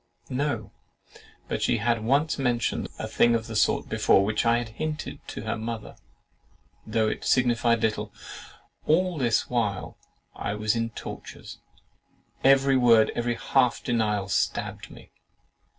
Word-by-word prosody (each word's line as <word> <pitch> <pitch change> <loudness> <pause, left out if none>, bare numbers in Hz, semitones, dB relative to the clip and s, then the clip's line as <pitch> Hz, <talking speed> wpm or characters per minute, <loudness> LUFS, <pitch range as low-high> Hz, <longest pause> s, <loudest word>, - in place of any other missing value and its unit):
"No; 125 -5 -2 0.8
but - - -3
she - - +2
had 115 0 0
once 140 +6 +1
mentioned 120 -3 0
a - - -4
thing 120 0 +3
of 115 -1 -2
the 115 - -7
sort, - - +2
which 105 +4 +2
I 115 0 +4
had 120 -1 -4
hinted 155 +7 -5
to - - -6
her - - -2
mother, 110 0 -6 0.9
though 110 0 +1
it - - -3
signified 120 -2 +2
little." 110 -1 -1 0.8
All 175 +1 +2
this 120 -4 +1
while 110 -6 -2 0.4
I 105 - -3
was 105 +1 0
in 115 0 -1
tortures. 110 - -9 0.8
Every 135 0 +5
word, 115 -3 +5
every 120 0 -1
half 125 0 +1
denial, 105 -4 0
stabbed 100 - -2
me. - - -15
115 Hz, 135 wpm, -26 LUFS, 110-130 Hz, 0.9 s, Every